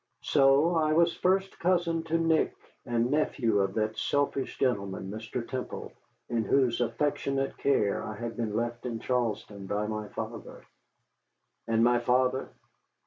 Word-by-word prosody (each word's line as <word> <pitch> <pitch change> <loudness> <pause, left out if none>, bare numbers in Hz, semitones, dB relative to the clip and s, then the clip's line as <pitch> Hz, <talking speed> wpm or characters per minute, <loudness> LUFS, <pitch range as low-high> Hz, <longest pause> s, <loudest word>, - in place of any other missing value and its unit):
So 140 +5 +4
I 155 -1 +2
was 170 +1 +4
first 190 +1 +1
cousin 170 -2 +1
to 165 +1 +1
Nick, 165 -1 +2 0.3
and 120 0 +1
nephew 135 -7 +1
to - - -11
that 110 0 -1
selfish 140 -1 -1
gentleman, 100 -6 -1
Mr. 110 +2 -5
Temple, 130 -2 -5 0.4
in 115 -2 0
whose 125 0 +2
affectionate 135 +2 -1
care 105 -8 +2
I 110 - -5
had 115 0 -5
been 110 -3 -2
left 120 +2 -2
in 115 -2 -3
Charlestown 110 -5 -2
by 105 +2 -1
my 105 0 -4
father. - - -7 1.0
And 115 0 +3
my 120 0 +4
father? 130 +2 +1
125 Hz, 140 wpm, -29 LUFS, 110-145 Hz, 1.0 s, So